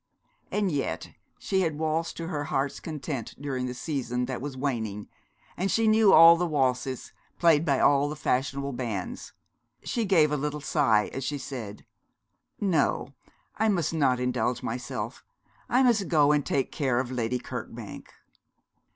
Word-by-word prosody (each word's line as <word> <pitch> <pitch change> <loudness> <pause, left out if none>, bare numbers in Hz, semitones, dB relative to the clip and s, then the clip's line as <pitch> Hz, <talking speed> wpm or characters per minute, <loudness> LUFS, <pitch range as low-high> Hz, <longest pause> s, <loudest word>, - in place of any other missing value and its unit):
And 205 -3 0
yet 145 -3 -3 0.3
she 190 -1 0
had 160 -4 -1
waltzed 160 +1 -1
to 165 - -4
her 145 -4 -3
heart's 135 0 -1
content 140 -6 -5
during 135 -3 -3
the 125 - -5
season 125 -4 -2
that 125 -1 -5
was 140 -1 -5
waning, 110 -7 -3 0.5
and 190 +3 -1
knew 220 -2 +5
all 165 0 +9
the 175 +1 -1
waltzes 130 -3 -1 0.2
played 165 -3 +4
by 140 -5 +1
all 145 0 +4
the 150 - -4
fashionable 140 -1 -1
bands. 115 -7 -5 0.5
She 230 -2 -1
gave 165 -6 +4
a 150 - +1
little 150 +1 -3
sigh, 135 -8 +2
as 135 - -4
she 145 +2 -2
said 120 -7 -7 0.7
'No, 165 -7 0 0.4
I 220 +1 +2
must 170 -6 0
not 135 -6 +2
indulge 125 0 -1
myself. 120 0 -5 0.5
I 255 +2 +4
must 230 -6 +3
go 150 -3 +4
and 150 -1 +2
take 135 -1 -1
care 130 -5 0
of 130 -1 -3
Lady 125 0 -1
Kirkbank.' - - -8
140 Hz, 155 wpm, -27 LUFS, 125-165 Hz, 0.7 s, all